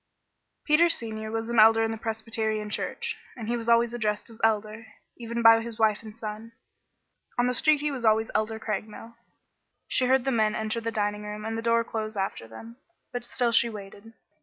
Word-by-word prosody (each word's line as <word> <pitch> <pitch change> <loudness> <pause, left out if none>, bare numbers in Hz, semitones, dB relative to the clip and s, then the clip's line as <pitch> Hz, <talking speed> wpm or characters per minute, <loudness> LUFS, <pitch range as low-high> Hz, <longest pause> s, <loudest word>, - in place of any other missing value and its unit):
Peter 325 +3 +5
Senior 220 -7 -3
was 225 0 -3
an 235 -1 +1
Elder 225 +1 +7
in 225 - 0
the 225 - -4
Presbyterian 220 -1 -2
Church, - - -2 0.2
and 225 -3 -6
he 240 - 0
was 235 -1 -3
always 235 0 +4
addressed 215 -2 -2
as 225 - -14
Elder, 220 0 0 0.3
even 235 0 -4
by 225 0 +8
his 230 -1 -7
wife 220 -2 +2
and 215 -2 -11
son. 225 0 -7 0.8
On 245 - +3
the 250 - +1
street 300 +3 +3
he 300 0 -1
was 260 -4 -5
always 220 0 +3
Elder 220 +1 0
Craigmile. 220 +2 -5 0.7
She 255 - +2
heard 260 0 +3
the 270 - +1
men 215 -3 +2
enter 220 +1 -2
the 230 0 -2
dining 210 -1 -1
room 210 0 -6
and 225 0 -3
the 225 - -3
door 230 0 +2
close 220 -2 -4
after 195 -12 -3
them, 225 - -11 0.4
but 245 0 -3
still 240 0 0
she 235 +1 +4
waited. 205 +1 -10
225 Hz, 200 wpm, -27 LUFS, 215-235 Hz, 0.8 s, by